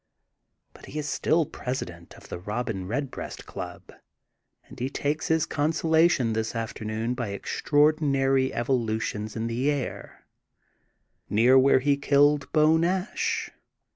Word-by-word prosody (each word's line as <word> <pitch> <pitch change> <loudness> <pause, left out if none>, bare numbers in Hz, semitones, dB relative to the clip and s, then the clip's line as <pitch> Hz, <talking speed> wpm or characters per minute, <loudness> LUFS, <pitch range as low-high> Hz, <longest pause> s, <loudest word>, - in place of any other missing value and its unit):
But - - -14
he 150 - -5
i^ - - -3
still 155 +2 +1
president 90 -13 -6
of - - -15
the - - -6
Robin 105 -1 -4
Red 135 +5 -2
breast - - -7
Club - - -8 0.7
and - - -14
he 125 +2 -1
takes 145 +2 -2
his 160 -1 +2
consolation 160 -4 +2
this 110 0 -2
afternoon 110 +1 -3
by 120 -3 -3
extraordinary 135 +4 +1
evolutions 110 -3 -2
in 115 0 -2
the 120 +5 0
air, 140 -4 -4 1.0
near 120 +5 +4
where 130 0 +5
he 140 +1 +2
killed 140 +1 +3
Beau 155 +1 +4
Nash. 180 +5 -1
135 Hz, 130 wpm, -26 LUFS, 115-150 Hz, 1.0 s, where